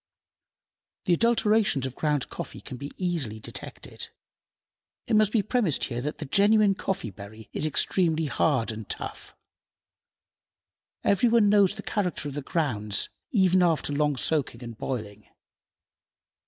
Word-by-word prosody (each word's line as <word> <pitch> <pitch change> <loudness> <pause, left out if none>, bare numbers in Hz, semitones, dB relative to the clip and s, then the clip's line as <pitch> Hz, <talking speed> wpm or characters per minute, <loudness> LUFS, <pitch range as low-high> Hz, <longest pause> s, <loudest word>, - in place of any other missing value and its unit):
The 180 - +3
adulterations 215 - +2
of 130 - -4
ground 150 -1 -1
coffee - - -6
can 130 - -9
be 140 +3 -6
easily 160 - -1
detected. - - -7 1.0
It 225 - +1
must 215 -1 +4
be 215 -3 +2
premised 215 - +1
here 120 -1 -2
that 150 +4 -4
the 155 - -6
genuine 205 +6 +4
coffee 190 - -3
berry 100 +3 -12
is 155 - 0
extremely 160 +1 +1
hard 140 -5 +1
and 110 -1 -8
tough. - - -6 1.7
Every 200 +4 +3
one 225 -3 +4
knows 205 -1 +4
the 205 - -8
character 180 -7 -2
of 145 - -5
the 145 - -4
grounds 115 - -1 0.2
even 185 -4 +3
after 165 -4 +1
long 145 -1 +1
soaking 130 -4 +1
and 115 -1 -7
boiling. 105 -4 -5
155 Hz, 140 wpm, -27 LUFS, 125-200 Hz, 1.7 s, must